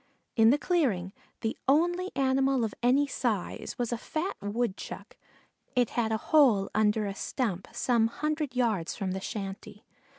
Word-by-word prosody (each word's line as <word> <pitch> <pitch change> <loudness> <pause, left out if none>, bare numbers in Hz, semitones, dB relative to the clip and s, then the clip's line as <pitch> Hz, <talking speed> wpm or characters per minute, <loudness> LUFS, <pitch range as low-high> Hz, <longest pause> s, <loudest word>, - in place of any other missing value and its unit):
In 225 -1 +6
the 275 - +5
clearing, 240 - 0 0.3
the 225 - -1
only 350 +6 +2
animal 270 -1 +2
of 220 - -2
any 260 +4 +4
size 235 -8 -2
was 240 -1 -1
a 235 - -3
fat 325 - -3
Woodchuck; 205 0 -4 0.6
it 245 -3 +2
had 225 -2 0
a 220 - +2
hole 230 -7 +4
under 215 0 +2
a 200 - -3
stump 200 -3 -3
some 235 -3 +2
hundred 300 +1 -2
yards 220 -9 0
from 190 -2 -3
the 190 +1 -3
shanty. 200 0 -6
235 Hz, 155 wpm, -29 LUFS, 210-270 Hz, 0.6 s, In